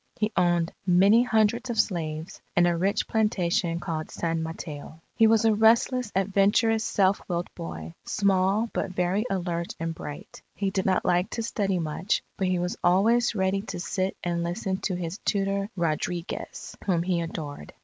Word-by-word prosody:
He 215 +1 -1
owned 175 -1 +2
many 195 +5 +5
hundreds 235 +1 +2
of 230 -2 -2
slaves 160 -4 -2
and 175 - +5
a 175 -1 +2
rich 190 +4 0
plantation 180 -5 +1
called 160 -2 -4
San 165 -1 -2
Mateo. 160 -1 -7 0.2
He 225 - +5
was 225 0 +4
a 220 - +5
restless, 225 +2 +3
adventurous, 205 +3 +3
self 195 -1 +2
willed 175 0 -2
boy, 80 0 -7
small 200 +2 +2
but 195 - -1
very 185 +4 0
alert 175 -2 -2
and 165 0 -2
bright. 150 -2 -9
He 195 -1 -1
did 190 -1 -1
not 185 - +2
like 180 +1 +2
to 230 - -1
study 200 -4 0
much; 165 +4 -1
but 190 - -1
he 185 0 +1
was 180 +1 -2
always 220 +7 +3
ready 190 0 +1
to 195 -3 -6
sit 185 +1 -2
and 170 -1 -1
listen 190 +2 -2
to 195 -1 -2
his 175 +2 -4
tutor 200 0 -1
Rodriguez, 170 +1 -3
whom 170 -3 +2
he 175 -1 0
adored. 150 - -6
185 Hz, 170 wpm, -26 LUFS, 170-205 Hz, 0.2 s, many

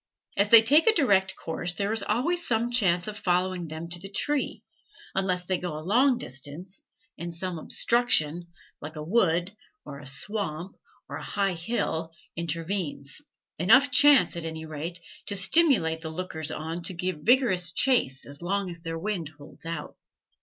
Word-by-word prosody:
As 200 +1 +2
they 230 0 +10
take 295 - +5
a 445 - +6
direct 195 - +3
course, 170 +2 -4
there 200 +3 -1
is 225 - -1
always 340 +11 -1
some 235 +1 0
chance 185 -7 +2
of 210 - -4
following 180 -2 0
them 160 +2 -7
to 175 0 -6
the 195 +2 -8
tree, 290 +8 -1 0.5
unless 185 -2 -1
they 185 0 0
go 175 -4 -4
a 155 - -8
long 250 +6 +3
distance, 145 - -6 0.4
and 170 0 -6
some 175 -1 -4
obstruction, 175 -6 +1 0.3
like 155 +2 -8
a 150 - -6
wood, 175 0 +1 0.3
or 140 -1 -8
a 145 - -11
swamp, 170 +3 -4 0.3
or - - -6
a - - -8
high 200 -2 -1
hill, 165 -3 -2 0.3
intervenes 165 -4 -2 0.4
enough 260 - +5
chance, 285 -3 +6
at 170 - -4
any 160 -1 -5
rate, 160 +3 -5 0.3
to 205 - -2
stimulate 195 - +3
the 160 - -5
lookers 160 -2 -4
on 160 +2 -5
to 175 +2 -5
give 180 -2 -2
vigorous 205 - +3
chase 180 - +1
as 145 +2 -11
long 190 +1 -2
as 170 -1 -10
their 165 -1 -4
wind 175 -3 -3
holds 145 +2 -12
out. 165 -3 -5
180 Hz, 170 wpm, -27 LUFS, 160-210 Hz, 0.5 s, they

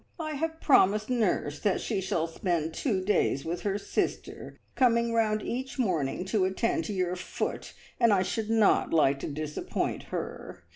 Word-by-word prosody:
I 310 -1 -3
have 320 +2 -3
promised 215 -4 +4
nurse 190 -11 0
that 200 -3 +1
she 205 -4 -2
shall 175 -3 0
spend 165 -1 -2
two 195 - -1
days 185 -8 +1
with 170 +2 -3
her 200 -1 -1
sister, - - -3 0.2
coming 235 -2 +3
round 215 -2 +1
each 260 +3 -4
morning 180 - 0
to 190 +1 +1
attend 190 +5 0
to 210 - -3
your 180 -2 -1
foot, 185 - -4 0.3
and 235 -2 +5
I 190 -2 +4
should 220 +3 -3
not 225 -2 +3
like 140 -4 +3
to - - -4
disappoint 150 +1 -3
her. - - -6
200 Hz, 165 wpm, -28 LUFS, 175-230 Hz, 0.3 s, and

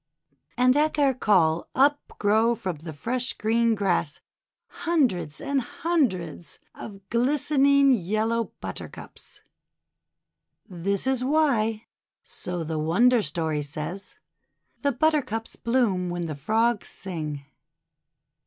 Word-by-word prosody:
And 255 +1 +4
at 305 +1 +2
their 280 -3 +3
call 170 -9 +2
up 285 +2 +2
grow 220 +3 +3
from 185 -6 -4
the 160 +2 -8
fresh 245 - -2
green 230 +1 +1
grass 180 -7 -1 0.5
hundreds 255 - -1
and 280 -1 -1
hundreds 230 - -2 0.2
of 195 -2 -10
glistening 275 +2 +3
yel 215 +1 0
low 230 0 +1 0.2
Buttercups. - - -8 1.3
This 195 +3 -2
is 260 -1 0
why 250 -7 +1 0.4
so 180 -3 -5
the 160 0 -3
wonder 225 +10 +3
story 155 -3 -1
says 155 +6 -6 0.3
— - - -44
the 285 - +2
Buttercups 255 -5 0
bloom 220 -7 +1
when 175 0 -3
the 160 - -4
Frogs 220 +10 0
sing. 155 -7 -5
220 Hz, 115 wpm, -25 LUFS, 175-260 Hz, 1.3 s, And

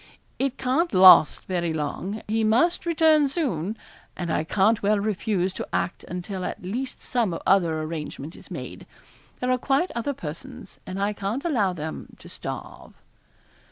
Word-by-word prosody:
It 270 -1 -1
can't 300 +7 0
last 185 -4 +8
very 175 -3 -1
long; 180 +8 -4
he 220 +1 0
must 295 +12 +2
return 315 -3 +4
soon, 225 - -2 0.4
and 175 -2 -2
I - - +1
can't 205 +6 +2
well 205 +1 +2
refuse 200 -2 -1
to - - -5
act 180 - -2
until 180 +2 -5
at - - -5
least 245 +8 -4
some 220 -9 -1
other 170 -5 +3
arrangement 155 -1 -6
is - - -14
made. - - -8 0.5
There 250 0 +1
are 255 - +2
quite 275 +8 +1
other 235 +4 -2
persons 160 - -9
and 185 +1 -5
I 200 +1 0
can't 205 - -3
allow 215 - +1
them 160 -2 -7
to - - -14
starve.' - - -8
205 Hz, 160 wpm, -25 LUFS, 180-255 Hz, 0.5 s, last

